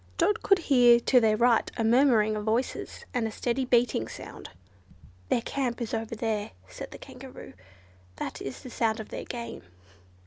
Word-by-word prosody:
Dot 405 +5 +2
could 395 - +4
hear 245 -8 +5
to 250 +2 +4
their 220 -2 +3
right 235 0 +3
a 230 - 0
murmuring 225 -2 +4
of 210 - -3
voices, 225 +4 -2
and 240 -3 0
a - - -5
steady 245 +4 -1
beating 240 - +2
sound. - - -9 0.8
"Their 235 - +1
camp 250 -3 -2
is 235 -3 -4
over 225 0 -3
there," 215 -2 -2
said 90 - -8
the - - -10
Kangaroo, - - -11 0.6
"that - - -6
is 135 - -7
the 255 - -9
sound 225 -1 0
of 220 - -7
their - - -6
game." 235 - -6
235 Hz, 175 wpm, -28 LUFS, 220-250 Hz, 0.8 s, hear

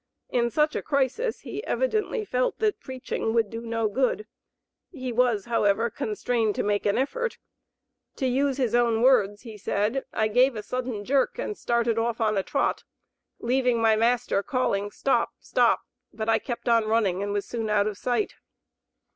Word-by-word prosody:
In 235 -1 +2
such 300 +4 +1
a - - -1
crisis 280 - 0
he 425 - -6
evidently 445 -3 -1
felt 255 -7 0
that 430 -1 0
preaching 255 -3 -3
would 225 -3 +2
do 230 0 -5
no 230 -1 -1
good; 260 - 0 0.6
he 260 -7 -5
was, 235 -4 +2
however, 225 -1 +1
constrained 220 +1 -1
to - - -1
make 205 0 0
an 205 - +2
effort. 475 - -1 0.8
To 265 - -2
use 270 +1 +1
his 250 -5 0
own 235 -1 +3
words, 205 -6 +3
he 220 -4 -10
said: 210 +7 0
"I 220 - +1
gave 250 +4 +3
a 210 - -5
sudden 245 -4 -4
jerk 275 - +1
and 460 -4 -3
started 235 - 0
off 230 0 -1
on 215 -2 +1
a 195 - +2
trot, - - -1 0.5
leaving 250 0 +1
my 225 -1 +4
master 230 -2 +1
calling, 205 -5 -1
'stop! 270 +6 0
stop!' - - +2 0.3
but 220 0 -5
I 225 - +3
kept 240 -1 -6
on 230 -2 +4
running, 210 -4 +1
and 205 0 -2
was 205 0 -1
soon 225 -2 -3
out 205 -1 +3
of 210 -1 -2
sight." 245 - -1
235 Hz, 175 wpm, -26 LUFS, 215-260 Hz, 0.8 s, my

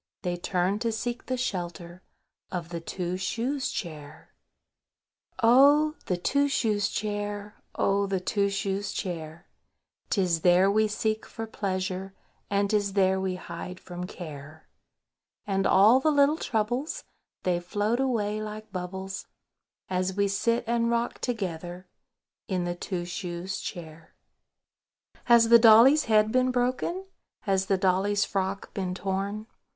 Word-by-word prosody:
They 180 -1 -1
turn 180 +3 0
to 230 0 0
seek 240 +2 -4
the 255 - -1
shelter 175 -6 -4 0.5
Of 175 -2 -4
the 170 -1 -4
Two 180 +1 -3
shoes 255 +8 -2
Chair. 155 -5 -7 1.1
Chorus.—Oh! 285 +6 +5
the 180 - 0
Two 280 +10 +1
shoes 210 -7 +1
Chair! 205 0 -4
Oh! 200 0 +1
the 195 -1 -1
Two 200 +2 0
shoes 195 0 -2
Chair! 165 -4 -5 0.6
'Tis 180 -5 +1
there 180 +3 +5
we 215 +1 +3
seek 215 +1 -2
for 225 - -6
pleasure, 190 -2 -3 0.3
And 200 0 +1
'tis 205 -2 +1
there 190 -1 +2
we 190 -1 -1
hide 180 +1 -7
from 180 0 -7
care. 155 -3 -10 0.8
And 195 -1 +1
all 215 +7 +6
the 310 - +2
little 290 +1 +4
troubles, 240 +6 -2 0.4
They 180 -1 +1
float 205 +6 -1
away 215 -5 0
like 215 0 -7
bubbles, 190 +1 -5 0.6
As 185 0 -1
we 200 0 +2
sit 230 +4 0
and 235 0 +1
rock 235 0 -1
together 180 -5 -4 0.6
In 185 -2 -1
the 175 0 -2
Two 175 0 -4
shoes 180 +2 -4
Chair. 160 -2 -8 1.1
Has 235 -2 +6
the 235 0 +9
dolly's 235 +7 +7
head 215 -1 +3
been 255 +1 +3
broken? 255 +9 -1 0.4
Has 190 -3 0
the 195 - +2
dolly's 195 +2 +2
frock 195 0 -3
been 185 -2 -3
torn? 195 +3 -3
200 Hz, 135 wpm, -27 LUFS, 180-225 Hz, 1.1 s, the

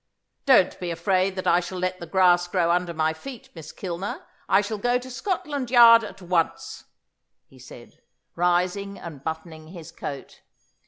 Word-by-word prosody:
"Don't 240 -9 +4
be 180 - -4
afraid 185 +3 0
that 185 - -5
I 175 - +4
shall 180 +1 -6
let 185 0 -2
the 170 - -8
grass 175 0 +3
grow 175 -2 +1
under 175 0 0
my 160 -1 0
feet, 245 +8 -11
Miss 160 -3 -10
Kilner. 185 +1 -6 0.2
I 195 - +5
shall 210 +1 -5
go 245 +3 +1
to 255 +1 -9
Scotland 290 - -3
Yard 230 -2 +8
at 200 -3 -10
once," 170 -2 -2 0.6
he - - -20
said, - - -14 0.3
rising 180 +3 0
and 150 -5 -10
buttoning 160 0 -6
his 170 -1 -11
coat. 140 -1 -8
180 Hz, 165 wpm, -24 LUFS, 170-205 Hz, 0.6 s, Yard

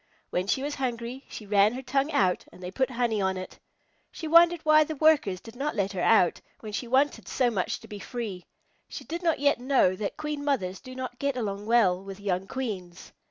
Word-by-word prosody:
When 180 +2 -1
she 265 +6 0
was 290 +1 -2
hungry 245 0 -4
she 215 - -8
ran 205 +1 +4
her 260 +2 -6
tongue 275 +4 0
out 190 - +1
and 180 - -14
they 180 - -5
put 260 +6 0
honey 235 -4 0
on 190 0 0
it. 185 - -8 0.5
She 320 - -6
wondered 335 +1 +6
why 310 0 +6
the 310 +1 -5
Workers 290 - +3
did 225 +3 -13
not 285 +4 -2
let 195 -1 0
her 185 -3 -3
out, 185 -5 +4 0.2
when 215 - -7
she 240 +3 -3
wanted 270 +4 +1
so 250 -2 +1
much 195 -5 -2
to - - -13
be 210 - -8
free. 205 -5 -6 0.4
She - - -7
did 335 +2 -5
not 330 -3 +2
yet 285 -1 +2
know 250 -8 +3
that 200 +1 -4
Queen 300 -1 -4
Mothers 195 -11 -1
do 255 0 -11
not 255 -1 -6
get 280 -2 -1
along 205 -3 -3
well 195 -6 +3
with 195 0 -9
young 195 -2 -2
Queens. 195 -10 -6
240 Hz, 220 wpm, -27 LUFS, 195-280 Hz, 0.5 s, wondered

